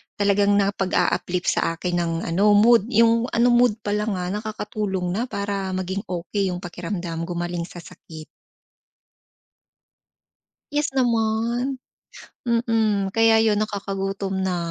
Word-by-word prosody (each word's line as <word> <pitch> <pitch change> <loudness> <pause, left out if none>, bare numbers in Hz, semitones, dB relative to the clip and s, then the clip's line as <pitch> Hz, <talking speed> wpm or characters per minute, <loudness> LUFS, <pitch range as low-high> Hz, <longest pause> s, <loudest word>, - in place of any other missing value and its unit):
talagang 205 0 +2
nakapag-uplift 195 -2 0
sa 165 - 0
akin 175 +1 -2
ng 170 -1 -1 0.2
ano, 205 +4 +4
mood 225 0 +5
yung 230 0 +3
ano, 240 +1 +4
mood 240 -2 +4
pa 205 - -2
lang 210 0 -1
nga 180 0 -3
nakakatulong 210 -3 -3
na 225 +7 -2
para 200 -3 -3
maging 190 +2 -4
okey 185 +3 -2
yung 180 0 -4
pakiramdam, 170 -1 -5
gumaling 175 -1 -3
sa 175 -1 -11
sakit. 160 -3 -12 2.5
Yes 295 0 +1
naman. 235 +2 0 0.7
Mm, 225 -4 +1
kaya 225 0 +5
yun 215 -2 +2
nakakagutom 195 -2 -3
na. 190 -1 -1
200 Hz, 120 wpm, -23 LUFS, 180-225 Hz, 2.5 s, mood